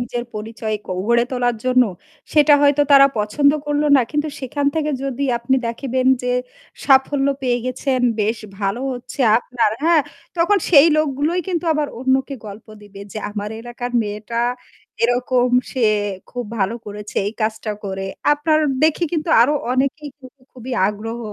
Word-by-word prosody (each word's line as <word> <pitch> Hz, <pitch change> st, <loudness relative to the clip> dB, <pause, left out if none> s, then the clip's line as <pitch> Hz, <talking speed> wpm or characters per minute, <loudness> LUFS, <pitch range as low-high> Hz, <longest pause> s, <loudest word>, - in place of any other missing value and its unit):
নিজের 240 Hz, 0 st, -4 dB
পরিচয় 220 Hz, 0 st, -4 dB
ক -, -, -22 dB, 0.2 s
গড়ে 235 Hz, +1 st, +3 dB
তোলার 245 Hz, -2 st, 0 dB
জন্য, 255 Hz, 0 st, +4 dB, 0.5 s
সেটা 295 Hz, -1 st, +6 dB
হয়তো 290 Hz, 0 st, +4 dB
তারা 275 Hz, 0 st, +8 dB
পছন্দ 250 Hz, +8 st, +2 dB, 0.2 s
করলো 295 Hz, 0 st, 0 dB
না। -, -, +4 dB
কিন্তু 300 Hz, +1 st, -1 dB
সেখান 280 Hz, +2 st, -2 dB
থেকে 305 Hz, -1 st, 0 dB
যদি 270 Hz, 0 st, -3 dB, 0.2 s
আপনি 235 Hz, +3 st, 0 dB
দেখেবেন 255 Hz, +2 st, -2 dB, 0.2 s
যে 250 Hz, 0 st, 0 dB, 0.5 s
সাফল্য 270 Hz, 0 st, +3 dB, 0.2 s
পেয়ে 245 Hz, -1 st, +1 dB
গেছেন, 255 Hz, 0 st, -1 dB, 0.2 s
বেশ 220 Hz, +3 st, 0 dB, 0.2 s
ভালো 200 Hz, +4 st, -1 dB
হচ্ছে 250 Hz, +2 st, -8 dB, 0.2 s
আপনার, 240 Hz, -3 st, 0 dB
হ্যাঁ? 330 Hz, -2 st, +4 dB, 0.3 s
তখন 390 Hz, +5 st, +3 dB
সেই 305 Hz, -2 st, +8 dB
লোকগুলোই 310 Hz, +3 st, 0 dB
কিন্তু 350 Hz, -2 st, -2 dB
আবার 300 Hz, -1 st, -1 dB
অন্যকে 265 Hz, +1 st, 0 dB
গল্প 210 Hz, +1 st, -10 dB, 0.2 s
দিবে 200 Hz, -1 st, -13 dB
যে, 215 Hz, -, -5 dB
"আমার 210 Hz, 0 st, -5 dB
এলাকার 240 Hz, +1 st, -6 dB
মেয়েটা 215 Hz, +3 st, -4 dB, 0.6 s
এরকম 245 Hz, +1 st, +2 dB, 0.2 s
সে 260 Hz, -, -4 dB, 0.5 s
খুব 245 Hz, -1 st, -4 dB
ভালো 195 Hz, +3 st, 0 dB
করেছে 210 Hz, 0 st, -9 dB
এই 205 Hz, -, -2 dB
কাজটা 220 Hz, 0 st, -2 dB
করে।" 195 Hz, -1 st, -4 dB, 0.3 s
আপনার 310 Hz, +1 st, +2 dB, 0.2 s
দেখে 315 Hz, +2 st, +2 dB
কিন্তু 325 Hz, -1 st, -2 dB
আরও 290 Hz, +5 st, +2 dB, 0.2 s
অনেকেই 275 Hz, +3 st, -1 dB
কিন্তু 260 Hz, 0 st, -16 dB
খুবই 255 Hz, 0 st, -8 dB, 0.2 s
আগ্রহ 225 Hz, +3 st, -5 dB
255 Hz, 155 wpm, -20 LUFS, 230-290 Hz, 0.6 s, তারা